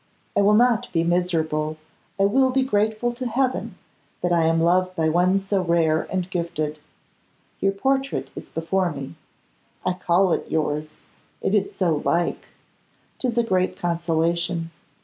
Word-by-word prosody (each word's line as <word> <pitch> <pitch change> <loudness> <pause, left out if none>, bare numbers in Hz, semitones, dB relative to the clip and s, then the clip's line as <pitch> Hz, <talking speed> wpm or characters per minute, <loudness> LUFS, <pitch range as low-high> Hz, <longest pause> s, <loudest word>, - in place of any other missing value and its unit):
I 200 - +4
will 205 +1 +5
not 245 +1 +3
be 165 -1 +2
miserable, 160 -3 0 0.4
I - - +4
will 260 +6 +4
be 265 +1 +2
grateful 220 0 0
to 245 +1 -4
Heaven 255 +2 -1 0.4
that 175 - 0
I 165 -1 +3
am 165 0 +2
loved 185 +2 +2
by 160 -2 +1
one 180 +4 +3
so 195 -1 +1
rare 165 -2 +1
and 185 -2 -1
gifted. 155 -3 -2 0.8
Your 195 0 +1
portrait 270 +6 -1
is - - -9
before 175 +2 0
me; 140 -9 -7 0.7
I 185 - +2
call 180 0 +2
it - - -3
yours; 155 -1 -1 0.5
it - - -1
is 200 -2 +1
so 165 -6 +1
like! 170 0 0 0.7
'Tis 245 -2 -2
a 235 - +4
great 185 -4 0
consolation. 170 0 0
180 Hz, 150 wpm, -23 LUFS, 165-210 Hz, 0.8 s, will